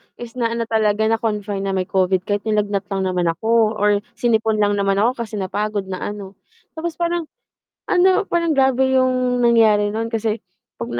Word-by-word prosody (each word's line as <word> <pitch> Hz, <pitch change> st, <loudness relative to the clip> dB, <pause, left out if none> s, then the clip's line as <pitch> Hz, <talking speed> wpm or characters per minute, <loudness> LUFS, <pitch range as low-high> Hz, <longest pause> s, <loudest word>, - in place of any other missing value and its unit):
is 240 Hz, 0 st, -10 dB
na 230 Hz, -1 st, 0 dB
ano 235 Hz, -, -1 dB
talaga, 220 Hz, -1 st, +1 dB
na-confine 210 Hz, -3 st, -1 dB
na 195 Hz, -, -1 dB
may 185 Hz, -, 0 dB
Covid 185 Hz, -1 st, +1 dB
kahit 205 Hz, +1 st, -2 dB
nilagnat 205 Hz, -2 st, 0 dB
lang 195 Hz, -1 st, -1 dB
naman 180 Hz, -1 st, -1 dB
ako 220 Hz, +6 st, +2 dB
or 205 Hz, -1 st, +2 dB, 0.2 s
sinipon 225 Hz, -2 st, +1 dB
lang 205 Hz, 0 st, +2 dB
naman 195 Hz, 0 st, +1 dB
ako 245 Hz, +4 st, +1 dB
kasi 215 Hz, 0 st, -9 dB
napagod 200 Hz, 0 st, -3 dB
na 185 Hz, -, -4 dB
ano. 200 Hz, -2 st, -7 dB, 0.4 s
Tapos 335 Hz, +1 st, -3 dB
parang 345 Hz, -1 st, -1 dB, 0.6 s
ano, 370 Hz, +1 st, +4 dB
parang 335 Hz, -2 st, +1 dB
grabe 265 Hz, -1 st, +2 dB
yung 255 Hz, -1 st, +1 dB
nangyari 220 Hz, -3 st, +4 dB
nun 225 Hz, +2 st, -2 dB
kasi 225 Hz, -1 st, -2 dB, 0.4 s
'pag 115 Hz, -, -5 dB
220 Hz, 175 wpm, -20 LUFS, 200-240 Hz, 0.6 s, ano